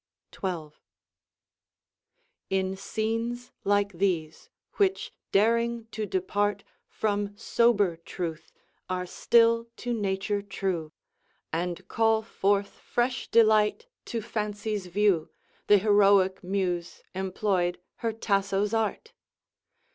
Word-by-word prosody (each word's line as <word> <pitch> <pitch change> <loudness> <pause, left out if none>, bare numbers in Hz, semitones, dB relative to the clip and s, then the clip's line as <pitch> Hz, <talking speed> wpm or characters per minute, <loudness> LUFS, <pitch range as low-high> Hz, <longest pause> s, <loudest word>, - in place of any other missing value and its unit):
XII 170 -5 -2 1.8
In 190 0 0
scenes 225 +4 -3
like 205 0 +2
these, 170 -4 -1 0.3
which, 390 -2 +1 0.2
daring 230 +2 +2
to 215 -1 -3
depart 200 +2 0 0.2
From 205 -1 -2
sober 210 -6 +2
truth, 165 -1 -6 0.4
are 180 0 -1
still 230 +4 +3
to 245 0 -3
nature 200 -1 -1
true, 190 -5 -3 0.6
And 175 +2 -2
call 225 0 +2
forth 200 -2 +1
fresh 250 +2 -1
delight 220 - +4 0.2
to 230 -2 -3
Fancy's 210 -2 -3
view, 190 -3 +2 0.4
Th' - - +6
heroic 200 -3 +4
muse 180 -2 -2
employed 185 -1 0 0.2
her 230 - -1
Tasso's 200 -1 0
art! 225 - -1
205 Hz, 95 wpm, -27 LUFS, 190-225 Hz, 1.8 s, Th